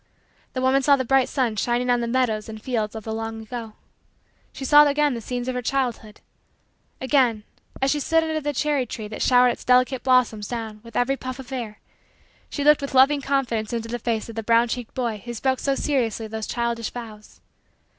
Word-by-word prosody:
The 255 - -2
woman 265 +1 +3
saw 280 +1 +5
the 260 -2 -2
bright 270 +1 +3
sun 245 -5 0
shining 245 +3 +1
on 245 -1 +2
the 235 - -2
meadows 230 -4 0
and 220 0 -7
fields 220 -2 -2
of 220 - -6
the 220 - -4
long 225 0 -4
ago. 220 0 -7 0.8
She 270 - -7
saw 295 +2 +7
again 290 0 +2
the 235 - -5
scenes 245 +2 -4
of 255 - -1
her 250 - -2
childhood. 240 -4 -2 0.8
Again, 255 -5 +2 0.4
as 270 - +3
she 300 - 0
stood 325 +3 +2
under 315 -1 -2
the 295 0 -1
cherry 285 -2 0
tree 215 -1 -6
that 215 - -7
showered 250 -1 +5
its 240 - -4
delicate 255 +1 +3
blossoms 245 -5 +2
down 225 -3 -5
with 230 0 -14
every 270 +3 +1
puff 255 -1 -6
of 265 0 -10
air, 230 -5 -5 0.7
she 285 - -3
looked 300 0 +5
with 280 -1 -5
loving 275 +2 +5
confidence 245 -6 -1
into 230 -1 -3
the 240 +1 -3
face 225 -1 -2
of 230 - -9
the 225 - -2
brown 230 +2 +3
cheeked 245 -1 -5
boy 235 -5 -2
who 240 0 -6
spoke 260 +2 0
so 275 -1 0
seriously 235 -7 -1
those 220 0 -5
childish 235 -1 -2
vows. 220 -3 -10
245 Hz, 210 wpm, -23 LUFS, 225-270 Hz, 0.8 s, saw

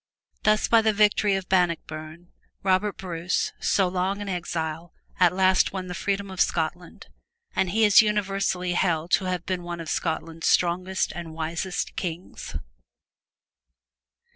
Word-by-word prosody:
Thus 215 0 +3
by 230 -1 +5
the 220 -1 +2
victory 210 -1 +3
of 190 -1 -4
Bannockburn, 170 -2 -1 0.3
Robert 195 +2 +1
Bruce, 175 -1 -2
so 190 -2 +2
long 185 +2 -1
an 205 - -5
exile, 165 -2 -4 0.2
at 180 -2 +6
last 185 0 +3
won 190 -1 -4
the 180 - -6
freedom 200 +1 -2
of 190 - -2
Scotland, 170 +1 -2 0.5
and 185 - +1
he 220 +4 +3
is 205 0 +8
universally 195 -4 0
held 170 -2 0
to 190 - +3
have 180 -1 -2
been 185 -1 -2
one 175 0 -6
of 165 - -5
Scotland's 165 -1 -2
strongest 180 +2 +1
and 165 -3 -7
wisest 165 +3 -3
kings. 175 0 -6
180 Hz, 140 wpm, -25 LUFS, 170-195 Hz, 0.5 s, is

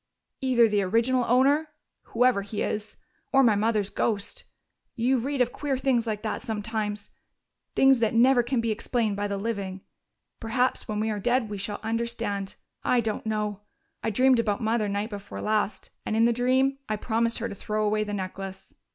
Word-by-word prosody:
"Either 250 -3 +4
the 210 -2 +1
original 230 +6 +2
owner 275 +6 +4 0.4
whoever 245 -3 +2
he 205 +1 -3
is 210 0 -4 0.3
or 270 0 +5
my 230 -4 +5
mother's 210 -1 +1
ghost. 205 -3 -2 0.5
You 250 +2 +2
read 275 +2 -1
of 245 0 +2
queer 280 -2 -2
things 255 -3 +1
like 215 -1 -3
that 215 - -2
sometimes, 210 -2 -3 0.6
things 270 -2 +5
that 230 0 +1
never 245 +2 +5
can 240 0 0
be 230 -1 0
explained 220 -1 -1
by 205 +1 -1
the 200 -1 -2
living. 195 -3 -3 0.6
Perhaps 245 +3 0
when 210 -1 -2
we 220 +1 0
are 210 - -3
dead 240 +1 +1
we 205 - -4
shall 205 +1 -3
understand.... 225 -3 -2 0.3
I 250 - +3
don't 220 -1 -2
know.... 210 -2 -2 0.4
I - - -1
dreamed 255 +3 +4
about 210 -3 0
Mother 220 -2 0
night 205 +3 -2
before 200 -1 -7
last, 215 -1 -1
and 215 - -2
in 225 +1 +4
the 235 - +3
dream 260 +3 +2
I 215 - +1
promised 230 +2 0
her 235 - -2
to - - -6
throw 215 +2 -2
away 215 0 +1
the 210 - -5
necklace.... 190 0 -6
225 Hz, 185 wpm, -26 LUFS, 210-245 Hz, 0.6 s, or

